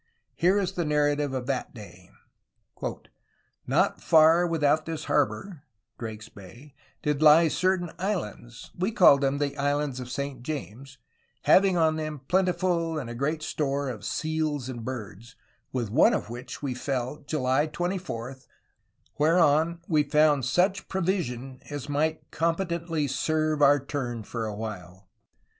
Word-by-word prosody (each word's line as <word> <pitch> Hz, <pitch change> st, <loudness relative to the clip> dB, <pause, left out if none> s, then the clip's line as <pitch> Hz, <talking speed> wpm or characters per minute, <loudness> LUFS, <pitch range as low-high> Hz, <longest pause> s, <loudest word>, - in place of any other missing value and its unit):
Here 185 Hz, +4 st, +3 dB
is 195 Hz, -3 st, 0 dB
the 175 Hz, -, -2 dB
narrative 145 Hz, -1 st, +1 dB
of 130 Hz, -2 st, -3 dB
that 135 Hz, -1 st, -3 dB
day: 95 Hz, -5 st, -12 dB, 1.6 s
"Not -, -, +1 dB
farre 165 Hz, +2 st, +5 dB
without 155 Hz, -1 st, +1 dB
this 165 Hz, -1 st, -4 dB
harborough 145 Hz, -, -1 dB, 0.4 s
[Drake's 110 Hz, -1 st, -7 dB
Bay] 115 Hz, +9 st, -14 dB, 0.3 s
did 150 Hz, -1 st, 0 dB
lye 155 Hz, +2 st, +7 dB
cer 185 Hz, +4 st, +2 dB
taine 175 Hz, -2 st, -6 dB
Hands 125 Hz, -, -4 dB
(we 185 Hz, +5 st, -1 dB
called 175 Hz, -, +6 dB
them 140 Hz, 0 st, +1 dB
the 145 Hz, 0 st, 0 dB
Hands 145 Hz, -1 st, -1 dB
of 125 Hz, -1 st, -7 dB
Saint 140 Hz, -1 st, -4 dB
James), 135 Hz, -1 st, -7 dB, 0.5 s
hauing 190 Hz, -1 st, +5 dB
on 160 Hz, -1 st, +3 dB
them 155 Hz, -3 st, -5 dB
plentifuU 175 Hz, -3 st, +1 dB
and 120 Hz, -3 st, -6 dB
great 155 Hz, +3 st, -1 dB
store 140 Hz, -3 st, -1 dB
of 115 Hz, -5 st, -6 dB
Seales 155 Hz, +1 st, -2 dB
and 120 Hz, -3 st, -6 dB
birds, 115 Hz, -2 st, -7 dB, 0.4 s
with 120 Hz, -6 st, -3 dB
one 185 Hz, -, +5 dB
of 115 Hz, -, -4 dB
which 120 Hz, +4 st, -8 dB
wee 135 Hz, -3 st, -1 dB
fell 130 Hz, +2 st, -3 dB
July 145 Hz, 0 st, +1 dB
24, 155 Hz, -7 st, -4 dB, 0.8 s
whereon 165 Hz, +1 st, +3 dB
we 155 Hz, -3 st, +3 dB
found 145 Hz, -2 st, +3 dB
such 185 Hz, +9 st, +1 dB
prouision 135 Hz, -9 st, -2 dB
as 145 Hz, -1 st, -5 dB
might 155 Hz, +2 st, -1 dB
competently 170 Hz, -2 st, -1 dB
serue 155 Hz, +3 st, 0 dB
our 145 Hz, 0 st, +6 dB
turne 125 Hz, -4 st, -4 dB
for 115 Hz, +1 st, -4 dB
a 105 Hz, -, -5 dB
while. 95 Hz, -3 st, -8 dB
145 Hz, 140 wpm, -27 LUFS, 125-165 Hz, 1.6 s, lye